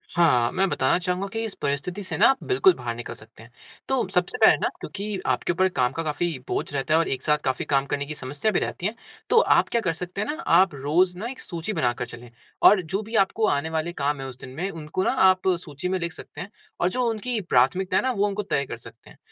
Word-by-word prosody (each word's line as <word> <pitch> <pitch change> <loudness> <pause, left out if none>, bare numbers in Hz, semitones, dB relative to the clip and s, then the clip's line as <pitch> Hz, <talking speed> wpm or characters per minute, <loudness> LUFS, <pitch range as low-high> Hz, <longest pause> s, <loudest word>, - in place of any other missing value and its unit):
हाँ, 125 -9 +4
मैं 190 +2 +1
बताना 130 -1 +2
चाहूँगा 180 +2 -2
कि 225 0 -2
इस 215 - -5
परिस्थिति 145 +8 -2
से 190 - -4
न - - +2
आप 270 - +6
बिल्कुल 385 -2 +4
बाहर 115 -1 -4
निकल 120 - -6
सकते 110 0 -15
हैं। 120 - -17 0.4
तो 265 -6 0
सबसे 180 -1 0
पहले - - +8
न - - +2
क्योंकि 205 -1 -5
आपके - - +1
ऊपर 185 +2 +3
काम 125 -8 +1
का 165 - -3
काफ़ी 155 +3 -1 0.2
बोझ - - -3
रहता 140 +2 -1
है 160 - +5
और 165 - +1
एक 130 -1 -3
साथ 150 -1 +3
काफ़ी 130 -1 -1
काम 135 -1 +1
करने 140 +1 -2
की 150 +1 -6
समस्या 145 +9 -2
भी 195 - +1
रहती 175 - -4
है 215 +3 -1 0.3
तो 470 - +6
आप - - +3
क्या 235 - +1
कर 165 -6 0
सकते 180 +4 -5
है 210 - -2
ना 335 - -8
आप 180 0 +5
रोज़ 170 +7 +1
न 215 +5 -4
एक 265 - -11
सूची 170 +4 -5
बना 120 -10 +1
कर 125 - -1
चले। 120 0 -11 0.4
और 205 -2 +4
जो 190 +4 -3
भी 220 +2 -7
आपको 215 +2 +2
आने 145 0 0
वाले 160 +1 -2
काम 145 -2 -1
है - - -5
उस 130 -1 -9
दिन 130 - -9
में 180 +6 -2
उनको 165 +1 -4
न - - 0
आप 190 -7 +3
सूची 150 +1 -5
में 190 0 0
लिख 170 -1 -3
सकते - - -10
हैं 195 - -7 0.3
और 175 - +2
जो 250 +6 -1
उनकी 225 +1 -2
प्राथमिकताएँ 180 +5 +2
है - - -1
ना - - +2
वो 200 - +3
उनको 205 +1 -3
तय 140 -8 -1
कर 125 - -7
सकते 115 - -15
है। - - -17
175 Hz, 265 wpm, -25 LUFS, 140-195 Hz, 0.4 s, पहले